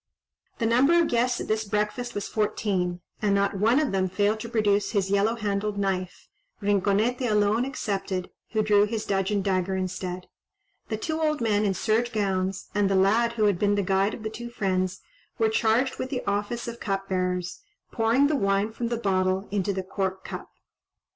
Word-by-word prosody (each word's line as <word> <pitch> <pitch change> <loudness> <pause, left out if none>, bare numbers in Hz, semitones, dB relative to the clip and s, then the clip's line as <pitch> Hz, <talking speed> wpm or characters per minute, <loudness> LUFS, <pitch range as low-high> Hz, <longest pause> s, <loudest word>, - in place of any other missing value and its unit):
The 230 - -1
number 265 +9 +4
of 335 - +2
guests 245 +1 +1
at - - -5
this 215 0 0
breakfast 210 +4 -2
was 205 - -3
fourteen, 190 -4 -1 0.2
and 205 -2 +2
not 200 -1 +1
one 230 +7 +4
of 305 -3 0
them 190 -1 +1
failed 205 +3 +1
to 230 - -6
produce 205 -3 +1
his 195 -2 0
yellow 205 +3 +2
handled 205 -1 -2
knife, 185 -2 -2 0.3
Rinconete 205 +5 +1
alone 210 +3 +2
excepted, 195 -8 -3 0.2
who 215 -1 +2
drew 210 -1 +4
his 220 0 -3
dudgeon 195 0 0
dagger 190 -1 0
instead. 185 -1 -4 0.6
The 220 - -1
two 315 +7 -3
old 305 -1 +1
men 215 -3 +1
in 195 -2 +1
serge 225 +5 +1
gowns, 195 -3 -1
and 205 -1 +2
the 195 - +2
lad 220 +5 +3
who 225 -2 0
had 200 -4 +3
been 205 0 +2
the 200 - +1
guide 195 +2 +1
of 220 - -11
the 220 - -3
two 240 +2 -7
friends, 185 -5 -1 0.4
were 225 -2 +3
charged 225 +4 +1
with 260 - -3
the 255 -2 -3
office 205 +4 -2
of 235 0 -6
cupbearers, 185 - -2 0.3
pouring 230 +4 +3
the 300 +1 +2
wine 200 -2 +1
from 235 +1 -3
the 235 0 -1
bottle 190 -2 0
into 200 -1 0
the 190 -1 -3
cork 190 0 -3
cup. - - -7
205 Hz, 185 wpm, -26 LUFS, 195-230 Hz, 0.6 s, number